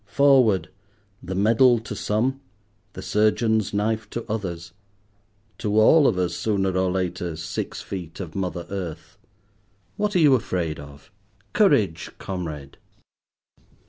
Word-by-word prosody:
Forward: 130 -9 +4 0.5
the 95 - -5
medal 115 +5 +4
to 110 -2 -7
some, 120 +7 -1 0.5
the - - -8
surgeon's 110 0 +1
knife 110 +1 -1
to 115 - -5
others; 85 -6 -5 0.9
to 105 +1 +1
all 145 +6 +6
of 100 - +1
us, 90 -1 0
sooner 95 -3 -1
or 95 0 +1
later, 90 -2 -2
six 85 +1 -5
feet 90 -4 -7
of 85 -5 -6
mother 90 -3 -3
earth. 90 -5 -6 0.8
What 210 -1 -1
are - - +4
you 150 -4 +6
afraid 90 - -1
of? 75 +4 -13 0.4
Courage, 105 - +2
comrade. 80 -7 -6
100 Hz, 125 wpm, -24 LUFS, 85-110 Hz, 0.9 s, all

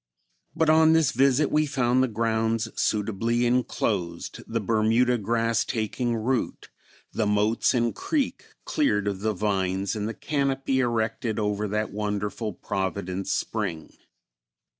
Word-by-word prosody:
But 160 - +2
on 160 +1 +6
this 160 -3 +3
visit 135 +2 +3
we 155 0 +2
found 130 -2 +2
the 130 - +3
grounds 115 0 0
suitably 110 +3 0
enclosed, 105 -8 -1
the 115 - -1
Bermuda 115 +3 +2
grass 115 +2 +1
taking 120 +2 -2
root, 120 +2 -2 0.4
the 110 -2 0
moats 105 +4 +2
and 120 -2 +1
creek 280 - -2 0.2
cleared 105 - +1
of 100 -2 -2
the 110 +2 0
vines 95 -1 -1
and 105 0 -2
the 115 - -5
conopy 135 -2 -1
erected 115 -2 -1
over 105 -1 -1
that 105 +1 -2
wonderful 105 +1 -2
Providence 95 +1 -3
Spring. 95 -8 -3
110 Hz, 130 wpm, -26 LUFS, 105-125 Hz, 0.4 s, on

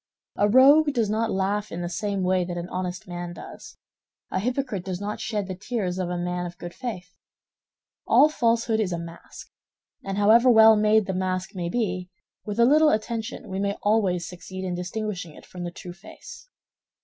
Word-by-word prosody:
A 205 - +2
rogue 285 +6 +6
does 225 -5 0
not 225 +1 0
laugh 200 +2 -1
in 170 - -5
the 175 - -3
same 200 +2 -2
way 185 0 +2
that 175 0 -5
an 175 0 -4
honest 180 -1 -4
man 175 -1 -6
does; - - -11 0.5
a - - 0
hypocrite 245 -3 -2
does 185 -1 -4
not 205 +1 -4
shed 210 -3 -2
the 190 - -5
tears 190 -2 -3
of 180 -1 -2
a 180 - -2
man 175 0 -2
of 175 - -11
good 175 0 -8
faith. 185 -8 -7 0.9
All 300 - +6
falsehood 230 -5 +1
is 205 -4 0
a 170 - -2
mask; 170 0 -10 0.5
and 195 0 -4
however 225 +5 +5
well 220 -1 +8
made 215 0 +3
the 190 - -3
mask 185 0 -2
may 175 -3 -3
be, 180 -4 -2 0.3
with 210 +1 -5
a 235 - +7
little 305 +4 +5
attention 225 0 -3
we 190 -1 -4
may 200 0 -1
always 195 -5 +1
succeed 185 +2 -8
in 180 - -2
distinguishing 180 -2 -4
it - - -14
from 180 -1 -8
the - - -3
true 175 0 -9
face. 480 - -13
195 Hz, 195 wpm, -25 LUFS, 180-220 Hz, 0.9 s, well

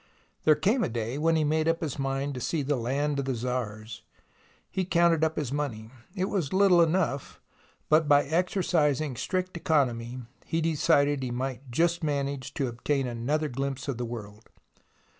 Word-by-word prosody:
There 155 - +6
came 210 - +2
a - - 0
day 115 +3 -3
when 165 +1 +3
he 155 - +2
made 155 +1 +1
up 165 0 +1
his 150 -4 -3
mind 135 +1 -1
to 125 - -6
see 155 +4 -1
the 145 +2 0
land 140 +4 -1
of 140 - -2
the 135 -1 -1
Tsars. 115 -3 -4 0.7
He 190 - -1
counted 170 -2 +3
up 160 0 +1
his 145 -5 -2
money. 120 -7 -3 0.2
It 185 -1 0
was 185 -8 -2
little 190 -2 +5
enough, 165 -4 0 0.5
but 155 0 +4
by 145 0 +5
exercising 155 -3 +1
strict 185 +8 -2
economy 125 -7 0 0.2
he 165 - -1
decided 145 -3 +2
he 130 - -2
might 130 +2 -4
just 170 +7 +1
manage 140 -3 -2
to 140 - 0
obtain 135 +3 -1
another 125 +6 -1
glimpse 135 +1 -4
of 130 -4 -3
the - - -1
world. 110 -2 -8
145 Hz, 175 wpm, -28 LUFS, 125-160 Hz, 0.7 s, There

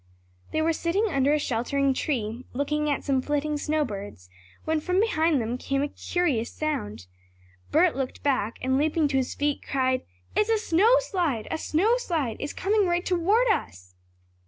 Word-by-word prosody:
They 315 - 0
were 325 +1 +2
sitting 350 +7 0
under 275 -3 +2
a 300 - +4
sheltering 275 +1 0
tree, 240 -4 -2
looking 300 +3 -1
at 285 - -1
some 270 -2 +1
flitting 295 +2 -1
snow 300 +1 0
birds, 195 - -8 0.3
when 315 0 +1
from 360 +4 0
behind 325 -8 +2
them 235 +2 -3
came 275 +1 -1
a - - 0
curious 285 -12 -1
sound. 110 - -3 0.6
Bert 335 +2 +3
looked 265 -1 -4
back, 255 -6 0
and 260 +1 +2
leaping 310 +1 +2
to 270 - +1
his 260 -1 -1
feet, 290 0 -1
cried: 260 -1 0 0.3
"It's 425 - +2
a 450 - +4
snow 425 +3 +4
slide! 335 - -1
A 320 - -2
snow 415 +13 +2
slide! 320 - -2
It's 285 - -4
coming 405 0 +1
right 350 +1 0
toward 390 +7 +2
us!" 90 - -2
295 Hz, 175 wpm, -26 LUFS, 260-345 Hz, 0.6 s, a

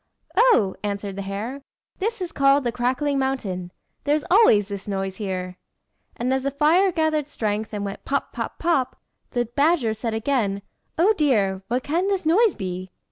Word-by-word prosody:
"Oh!" 335 - +4
answered 200 -1 -3
the 200 - -4
hare, 210 +8 -5 0.4
"this 440 +1 -2
is 350 - -5
called 275 0 +3
the 240 - 0
Crackling 260 +4 0
Mountain. 195 -10 -2 0.3
There's 295 +1 +1
always 290 - +6
this 200 -1 -7
noise 195 -1 -3
here." 185 -3 -4 0.6
And 250 +2 0
as 265 - +1
the 275 - 0
fire 315 +7 +3
gathered 315 -3 0
strength, 215 -4 -2
and 205 -1 -3
went 195 - -6
pop! 280 0 -2
pop! - - -4
pop! 275 -7 0 0.3
the 240 -1 0
badger 280 -1 +2
said 220 0 -3
again 220 -5 0 0.3
"Oh 375 +7 +5
dear! 200 -10 +2
what 250 +2 -1
can 340 +6 0
this 390 -4 -1
noise 395 +5 +4
be?" 185 -2 -5
250 Hz, 170 wpm, -23 LUFS, 200-300 Hz, 0.6 s, always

